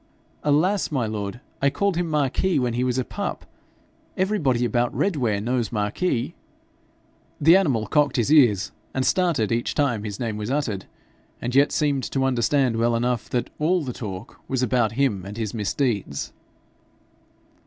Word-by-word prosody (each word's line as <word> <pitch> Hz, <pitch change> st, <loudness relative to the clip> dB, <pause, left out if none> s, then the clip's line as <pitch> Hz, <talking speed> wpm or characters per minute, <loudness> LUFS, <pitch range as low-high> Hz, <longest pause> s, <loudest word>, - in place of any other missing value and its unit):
'Alas, 165 Hz, +7 st, +2 dB
my 130 Hz, -6 st, 0 dB
lord! 105 Hz, +2 st, -4 dB, 0.2 s
I 140 Hz, -, +4 dB
called 185 Hz, +7 st, 0 dB
him 175 Hz, -1 st, -1 dB
Marquis 150 Hz, +5 st, +1 dB
when 125 Hz, -3 st, 0 dB
he 120 Hz, +2 st, 0 dB
was 125 Hz, 0 st, 0 dB
a 130 Hz, -, 0 dB
pup. -, -, -4 dB, 0.7 s
Everybody 155 Hz, -, +1 dB
about 120 Hz, 0 st, +1 dB
Redware 125 Hz, -, +1 dB
knows 120 Hz, +2 st, -1 dB
Marquis.' 115 Hz, -, -1 dB, 1.1 s
The 160 Hz, +4 st, +7 dB
animal 140 Hz, -, +2 dB
cocked 145 Hz, +5 st, +2 dB
his 125 Hz, +3 st, +2 dB
ears 115 Hz, -10 st, +4 dB, 0.2 s
and 130 Hz, 0 st, +1 dB
started 170 Hz, -, +1 dB
each 115 Hz, +1 st, -1 dB
time 130 Hz, -8 st, +1 dB
his 105 Hz, -2 st, -5 dB
name 115 Hz, -3 st, -2 dB
was 105 Hz, +1 st, -4 dB
uttered, 130 Hz, -9 st, -1 dB, 0.5 s
and 120 Hz, -, -3 dB
yet 140 Hz, +2 st, +4 dB
seemed 145 Hz, -4 st, +1 dB
to 135 Hz, -1 st, 0 dB
understand 130 Hz, -1 st, +2 dB
well 115 Hz, +1 st, +2 dB
enough 120 Hz, -1 st, -1 dB
that 125 Hz, -, -2 dB
ALL 170 Hz, +3 st, +2 dB
the 125 Hz, -3 st, -4 dB
talk 95 Hz, -5 st, -7 dB
was 130 Hz, -1 st, 0 dB
about 120 Hz, -2 st, +1 dB
him 115 Hz, -7 st, 0 dB
and 100 Hz, +3 st, -8 dB
his 110 Hz, -3 st, -3 dB
misdeeds. 105 Hz, -, -2 dB
125 Hz, 160 wpm, -24 LUFS, 110-145 Hz, 1.1 s, The